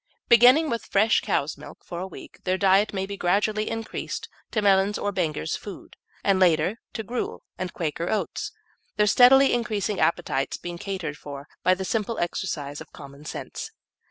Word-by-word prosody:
Beginning 250 Hz, +7 st, +7 dB
with 230 Hz, -5 st, -2 dB
fresh 215 Hz, +3 st, +3 dB
cow's 140 Hz, +3 st, -1 dB
milk -, -, -12 dB
for 175 Hz, -, -6 dB
a 185 Hz, -, -4 dB
week, -, -, -12 dB
their 185 Hz, 0 st, +1 dB
diet 195 Hz, +2 st, +4 dB
may 190 Hz, -1 st, -2 dB
be 200 Hz, +1 st, -6 dB
gradually 205 Hz, +4 st, +1 dB
increased 225 Hz, 0 st, -4 dB, 0.2 s
to 220 Hz, -, -1 dB
Mellin's 200 Hz, 0 st, +3 dB
or 205 Hz, -, -1 dB
Benger's 160 Hz, -5 st, -1 dB
food, 200 Hz, -3 st, -9 dB, 0.3 s
and 195 Hz, -2 st, +3 dB
later 180 Hz, +3 st, +3 dB
to 220 Hz, -, -4 dB
gruel 240 Hz, +3 st, -4 dB, 0.2 s
and 185 Hz, -1 st, -3 dB
Quaker 165 Hz, +1 st, -3 dB
Oats, 215 Hz, -, -2 dB, 0.5 s
their 210 Hz, -, +4 dB
steadily 260 Hz, +5 st, +7 dB
increasing 215 Hz, -4 st, -1 dB
appetites 135 Hz, -4 st, 0 dB
being 175 Hz, -1 st, -7 dB
catered 175 Hz, -7 st, -4 dB
for 140 Hz, 0 st, -8 dB
by 185 Hz, -, +4 dB
the 190 Hz, +1 st, -4 dB
simple 225 Hz, +2 st, -1 dB
exercise 150 Hz, -5 st, -3 dB
of -, -, -11 dB
commonsense. 140 Hz, +1 st, -8 dB
195 Hz, 165 wpm, -25 LUFS, 170-215 Hz, 0.5 s, Beginning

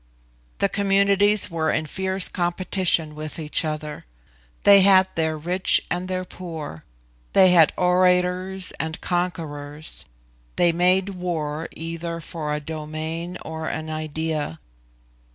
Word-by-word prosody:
The -, -, +2 dB
communities 200 Hz, 0 st, +3 dB
were 160 Hz, -1 st, 0 dB
in 155 Hz, +1 st, 0 dB
fierce 190 Hz, +4 st, -1 dB
competition 175 Hz, -3 st, 0 dB
with 155 Hz, 0 st, -7 dB
each 155 Hz, -1 st, +1 dB
other. 155 Hz, -1 st, -5 dB, 0.6 s
They 200 Hz, -1 st, +8 dB
had 190 Hz, -1 st, +6 dB
their 160 Hz, -1 st, -1 dB
rich 180 Hz, +4 st, +3 dB
and 180 Hz, +1 st, -2 dB
their 185 Hz, 0 st, -3 dB
poor; 160 Hz, -, -8 dB, 0.5 s
they 185 Hz, -1 st, +6 dB
had 165 Hz, -3 st, +6 dB
orators 180 Hz, +1 st, +2 dB
and 160 Hz, +1 st, -3 dB
conquerors; 155 Hz, -4 st, -4 dB, 0.5 s
they 175 Hz, -, +4 dB
made 180 Hz, +3 st, +2 dB
war 165 Hz, -4 st, -3 dB
either 165 Hz, +1 st, -5 dB
for 155 Hz, -2 st, -5 dB
a 150 Hz, -, -1 dB
domain 160 Hz, +3 st, -5 dB
or 160 Hz, 0 st, -5 dB
an 155 Hz, 0 st, -4 dB
idea. 155 Hz, -, -3 dB
170 Hz, 120 wpm, -23 LUFS, 155-185 Hz, 0.6 s, They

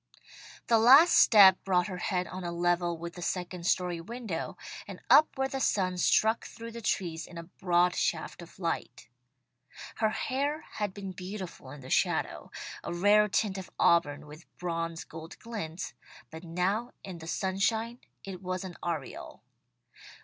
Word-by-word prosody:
"] -, -, -17 dB
The 230 Hz, -1 st, +4 dB
last 270 Hz, +9 st, +8 dB
step 195 Hz, -4 st, +7 dB
brought 180 Hz, -2 st, +2 dB
her 185 Hz, -3 st, -5 dB
head 180 Hz, 0 st, -1 dB
on 185 Hz, +1 st, -7 dB
a 175 Hz, -, -3 dB
level 175 Hz, 0 st, 0 dB
with 170 Hz, +1 st, -7 dB
the 175 Hz, -, -9 dB
second 180 Hz, 0 st, -3 dB
story 180 Hz, -2 st, 0 dB
window, 220 Hz, -3 st, -5 dB, 0.3 s
and -, -, -8 dB
up 305 Hz, -2 st, +6 dB
where 265 Hz, 0 st, +1 dB
the 270 Hz, 0 st, -4 dB
sun 185 Hz, -7 st, 0 dB
struck 220 Hz, +5 st, +3 dB
through 230 Hz, 0 st, -9 dB
the 235 Hz, 0 st, -8 dB
trees 170 Hz, -6 st, -2 dB
in 170 Hz, -, -11 dB
a 170 Hz, -, -6 dB
broad 175 Hz, 0 st, +1 dB
shaft 165 Hz, 0 st, -2 dB
of 170 Hz, -, -13 dB
light. 170 Hz, -3 st, -4 dB, 0.9 s
Her 220 Hz, -1 st, +2 dB
hair 280 Hz, +7 st, -2 dB, 0.2 s
had 205 Hz, -2 st, -1 dB
been 195 Hz, -2 st, -6 dB
beautiful 185 Hz, -6 st, -8 dB
in 145 Hz, +1 st, -10 dB
the 130 Hz, -, -10 dB
shadow; -, -, 0 dB, 0.3 s
a -, -, -5 dB
rare 205 Hz, +4 st, +4 dB
tint 200 Hz, -1 st, 0 dB
of 185 Hz, -, -9 dB
auburn 150 Hz, -4 st, +3 dB
with 150 Hz, +3 st, -13 dB
bronze 165 Hz, -1 st, -3 dB
gold 160 Hz, 0 st, -10 dB
glints, 190 Hz, -7 st, -6 dB, 0.4 s
but 160 Hz, +1 st, -9 dB
now 185 Hz, +8 st, -1 dB
in 185 Hz, -3 st, -8 dB
the 160 Hz, -, -10 dB
sunshine 220 Hz, +6 st, -1 dB, 0.2 s
it 190 Hz, -2 st, -8 dB
was 185 Hz, 0 st, -3 dB
an 185 Hz, -2 st, -8 dB
aureole. 160 Hz, -6 st, -5 dB
185 Hz, 165 wpm, -29 LUFS, 170-210 Hz, 0.9 s, last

